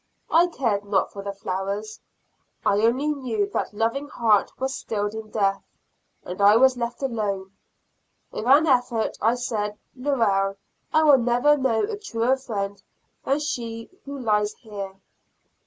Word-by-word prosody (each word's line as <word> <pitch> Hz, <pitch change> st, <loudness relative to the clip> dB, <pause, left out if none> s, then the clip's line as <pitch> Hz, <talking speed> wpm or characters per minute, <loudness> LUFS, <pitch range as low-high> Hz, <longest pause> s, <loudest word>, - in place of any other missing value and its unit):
I 340 Hz, +2 st, +5 dB
cared 230 Hz, -, -1 dB
not 200 Hz, -1 st, +1 dB
for 200 Hz, -, -6 dB
the 200 Hz, 0 st, -4 dB
flowers, 200 Hz, +2 st, -4 dB, 0.7 s
I 200 Hz, -, +3 dB
only 255 Hz, +7 st, +2 dB
knew 245 Hz, -8 st, -1 dB
that -, -, -1 dB
loving 230 Hz, +7 st, -1 dB
heart 225 Hz, -7 st, +2 dB
was 265 Hz, 0 st, -2 dB
stilled 205 Hz, -4 st, -3 dB
in 220 Hz, -1 st, -7 dB
death, 195 Hz, -2 st, +1 dB, 0.6 s
and 180 Hz, +3 st, -6 dB
I 205 Hz, +1 st, +7 dB
was 260 Hz, +1 st, +5 dB
left 240 Hz, +2 st, -4 dB
alone; 205 Hz, -6 st, -2 dB, 0.8 s
with 215 Hz, -, -5 dB
an 285 Hz, +5 st, +6 dB
effort, 245 Hz, -5 st, +1 dB
I 225 Hz, +3 st, +3 dB
said, 210 Hz, -4 st, -3 dB, 0.2 s
"Lorelle 225 Hz, -8 st, +1 dB, 0.4 s
will 305 Hz, -4 st, +6 dB
never 245 Hz, +5 st, +3 dB
know 260 Hz, -5 st, +1 dB
a 420 Hz, -1 st, -3 dB
truer 245 Hz, -, +1 dB
friend 200 Hz, -6 st, -4 dB, 0.4 s
than 275 Hz, -, +2 dB
she 230 Hz, -5 st, -4 dB
who 280 Hz, 0 st, -6 dB
lies 210 Hz, -4 st, +1 dB
here." 200 Hz, -4 st, -8 dB
230 Hz, 145 wpm, -24 LUFS, 205-265 Hz, 0.8 s, I